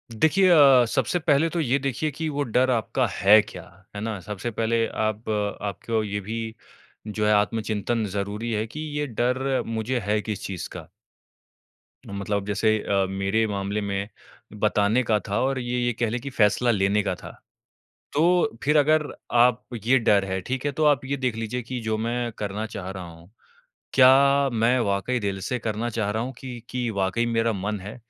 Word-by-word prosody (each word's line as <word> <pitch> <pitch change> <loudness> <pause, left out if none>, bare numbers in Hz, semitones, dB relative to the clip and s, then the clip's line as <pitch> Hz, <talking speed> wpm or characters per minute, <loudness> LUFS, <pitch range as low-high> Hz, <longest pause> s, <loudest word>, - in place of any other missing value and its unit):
देखिए 180 - +4
अ, 135 -7 +7
सबसे 135 +8 0
पहले 155 0 +3
तो 170 - -3
ये 135 -3 +2
देखिए 140 +3 -2
कि 160 +3 -4
वो 145 -1 -1
डर 125 +1 +1
आपका 125 +2 0
है 100 +4 +6
क्या, - - -10 0.3
है 100 - -4
ना? 110 -2 -3
सबसे 105 +5 -5
पहले 115 +1 +1
आप 110 +1 -3 0.3
आपको 110 +2 -2
ये 105 -1 -3
भी 110 +2 -5 0.5
जो 105 0 -2
है 105 - +4
आत्मचिंतन 110 +1 0
ज़रूरी 105 +3 -3
है 110 0 -1
कि 150 - -9 0.2
ये 150 - -1
डर 130 +3 0
मुझे 115 +2 -2
है 105 +1 +1
किस 105 -3 -5
चीज़ 95 -3 -5
का। 80 -3 -9 1.2
मतलब 100 0 -3
जैसे 110 +1 +1
अ, 100 -1 +1
मेरे 95 +3 0
मामले 100 +1 -2
में 100 +1 -3 0.4
बताने 105 +3 +2
का 110 -2 +2
था 100 +2 0
और 135 0 0
ये 125 0 -2
ये 120 - +1
कह 115 -2 +1
लें 120 - -2
कि 140 - -5
फैसला 120 0 +2
लेने 100 0 +2
का 95 - -1
था। - - -10 0.8
तो 170 -4 +2
फिर 150 +2 +3
अगर 155 +1 +3 0.3
आप 120 0 +4 0.2
ये 130 +2 +5
डर 100 -3 +3
है, 95 0 -2
ठीक 130 +7 -4
है, 145 - +1
तो 155 +2 0
आप 145 -2 +3
ये 140 +1 -2
देख 125 -4 -1
लीजिए 115 +2 -3
कि 125 +2 -5
जो 110 -1 -1
मैं 120 +1 -2
करना 105 +1 -3
चाह 100 -4 -7
रहा 95 -1 -7
हूँ, 85 +3 -15 0.6
क्या 140 +1 +6
मैं 115 +3 +3
वाक़ई 105 +3 0
दिल 100 -3 -2
से 125 - -1
करना 110 +1 -2
चाह 110 -3 -2
रहा 110 +2 -1
हूँ, 130 +1 -5
कि 125 -3 -8
कि 125 -2 -2
वाक़ई 100 +2 0
मेरा 115 -1 +1
मन 100 +1 -3
है। 100 +3 -8
115 Hz, 190 wpm, -24 LUFS, 105-130 Hz, 1.2 s, अ